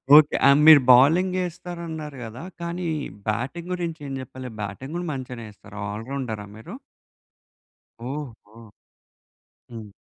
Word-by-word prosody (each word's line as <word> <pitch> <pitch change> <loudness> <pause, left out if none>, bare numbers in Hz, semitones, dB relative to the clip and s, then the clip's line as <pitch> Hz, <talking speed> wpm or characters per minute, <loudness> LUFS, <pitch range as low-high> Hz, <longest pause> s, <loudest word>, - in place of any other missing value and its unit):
Okay. 150 -1 +7
ఆహ్, 140 +1 +6
మీరు 155 -3 +10
bowling 165 +9 +5
ఏస్తారు 175 0 -7
అన్నారు 155 -3 -6
గదా! 115 +6 -8 0.2
కానీ 170 +1 -4 0.4
బ్యాటింగ్ 130 - -3
గురించి 170 -2 -3
ఏం 135 - -5
జెప్పలే? 130 0 -8
బ్యాటింగ్ 105 +9 -6
గూడా 175 0 -3
మంచిగనే 125 -3 -6
చెస్తారా? 105 0 -14
ఆల్ 110 +2 -6
రౌండరా 120 -7 -4
మీరు? 110 - -10 1.4
ఓహో! 130 -7 -8 1.2
హ్మ్. 115 -3 -9
135 Hz, 125 wpm, -24 LUFS, 115-165 Hz, 1.4 s, మీరు